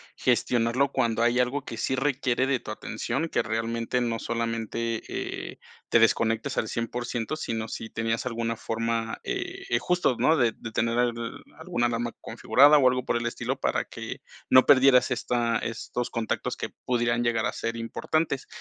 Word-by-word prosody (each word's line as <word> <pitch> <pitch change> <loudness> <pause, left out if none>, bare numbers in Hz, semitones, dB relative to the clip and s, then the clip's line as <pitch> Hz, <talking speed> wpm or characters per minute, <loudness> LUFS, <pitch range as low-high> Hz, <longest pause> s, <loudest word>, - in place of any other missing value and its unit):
gestionarlo 120 +3 +2
cuando 115 -3 +1
hay 120 +1 +3
algo 130 +3 0
que 115 - -6
sí 130 - -1
requiere 135 -2 +1
de 130 -3 +1
tu 105 - -7
atención, 135 +9 -3
que - - +1
realmente, 115 +2 -1
no 115 -2 -1
solamente, 115 0 -2
eh, - - -5 0.3
te 115 - +5
desconectes 115 0 +2
al 110 - 0
100%, 120 +3 -3
sino 115 -7 -3
si 110 0 -6
tenías 115 +1 -2
alguna 115 -1 -2
forma, 115 0 -2
eh - - -4
eh, 120 - +2
justo, 180 -7 +1
¿no? 160 0 +3
De 120 -4 +3
de 115 - -8
tener 115 +1 0
alguna 120 0 -2
alarma 120 0 -2
configurada, 145 +3 +5
o 130 -3 +5
algo 125 0 +1
por 120 - 0
el 120 - -3
estilo 120 - -2
para - - 0
que - - -8 0.3
no 130 - +7
perdieras 130 -2 +6
esta 120 -1 0
estos 115 +1 -4
contactos 115 -2 -2
que - - -4 0.2
pudieran 120 -1 +1
llegar 115 -2 +1
a - - 0
ser 115 0 -3
importantes. 135 +5 -2
120 Hz, 170 wpm, -27 LUFS, 115-125 Hz, 0.3 s, no